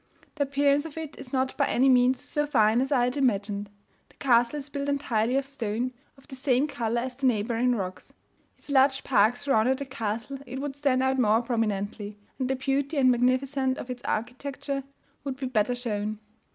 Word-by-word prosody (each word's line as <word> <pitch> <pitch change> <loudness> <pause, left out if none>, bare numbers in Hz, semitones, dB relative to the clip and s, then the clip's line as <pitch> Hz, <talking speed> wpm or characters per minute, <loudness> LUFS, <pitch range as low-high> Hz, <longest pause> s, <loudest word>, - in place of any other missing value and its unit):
The 290 -2 0
appearance 280 +1 +2
of 320 -1 -9
it 315 -3 -6
is 265 -2 -9
not 260 -1 0
by - - +2
any 260 +3 +3
means 255 0 +4
so 295 0 -2
fine 225 -3 +3
as 270 +2 -2
I 255 -4 +3
had 250 +3 0
imagined. 205 -5 0 0.4
The - - -24
castle 240 +1 +3
is 285 -1 -6
built 285 -1 -3
entirely 250 -4 0
of 275 0 +1
stone, 250 -2 -3 0.2
of 270 - -21
the 270 - -8
same 260 0 +2
colour 235 -4 -1
as 255 0 -5
the 270 0 +1
neighbouring 235 +2 +1
rocks. 185 -3 -5 0.5
If - - -24
a - - -3
large 270 0 +4
park 225 -1 +3
surrounded 265 -2 +2
the 280 - -5
castle, 230 +1 -4
it 260 +2 -5
would 280 -1 -4
stand 275 -3 +1
out 265 0 +1
more 225 0 +3
prominently, 210 -3 -2 0.2
and 260 -1 -1
the 265 - +1
beauty 275 +3 -1
and 260 -2 +5
magnificence 260 +2 +1
of 250 - -6
its 250 -1 -6
architecture 275 +4 -3 0.4
would 275 -2 -3
be 265 - -4
better 245 -1 +1
shown. 215 -3 -3
255 Hz, 200 wpm, -27 LUFS, 230-275 Hz, 0.5 s, and